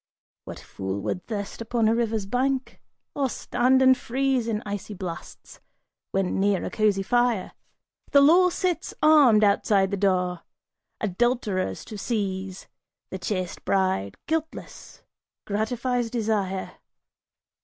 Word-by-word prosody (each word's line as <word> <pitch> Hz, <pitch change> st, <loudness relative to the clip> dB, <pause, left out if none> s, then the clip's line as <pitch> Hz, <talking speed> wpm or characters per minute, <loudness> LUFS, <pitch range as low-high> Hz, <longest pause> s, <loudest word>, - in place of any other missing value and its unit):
What -, -, -8 dB
fool 95 Hz, +1 st, -5 dB
would 110 Hz, -, -4 dB
thirst 205 Hz, -1 st, -5 dB
upon 230 Hz, 0 st, 0 dB
a 220 Hz, -, +3 dB
river's 225 Hz, -3 st, -1 dB
brink? 260 Hz, +4 st, -1 dB, 0.3 s
Or 275 Hz, -2 st, 0 dB
stand 255 Hz, +2 st, +2 dB
and 260 Hz, 0 st, +7 dB
freeze 255 Hz, 0 st, -1 dB
In 215 Hz, -2 st, -2 dB
icy 205 Hz, 0 st, -5 dB
blasts, 180 Hz, -3 st, -8 dB, 0.5 s
when 195 Hz, -1 st, -1 dB
near 200 Hz, -1 st, +1 dB
a -, -, -4 dB
cozy 210 Hz, -3 st, +1 dB
fire? 240 Hz, -3 st, +1 dB, 0.6 s
The 280 Hz, -, +6 dB
law 350 Hz, +6 st, +6 dB
sits 360 Hz, -1 st, -2 dB
armed 285 Hz, -9 st, +6 dB
outside 200 Hz, -1 st, +3 dB
the 200 Hz, -, -1 dB
door, 180 Hz, -3 st, 0 dB, 0.6 s
adulterers 210 Hz, -, -1 dB
to 215 Hz, -, -8 dB
seize, 195 Hz, -4 st, -3 dB, 0.4 s
The 190 Hz, -, -5 dB
chaste 185 Hz, -2 st, -4 dB
bride, 185 Hz, -, 0 dB
guiltless, 320 Hz, 0 st, -5 dB, 0.4 s
gratifies 235 Hz, +3 st, -1 dB
desire. 210 Hz, -5 st, -2 dB
215 Hz, 120 wpm, -25 LUFS, 190-245 Hz, 0.6 s, and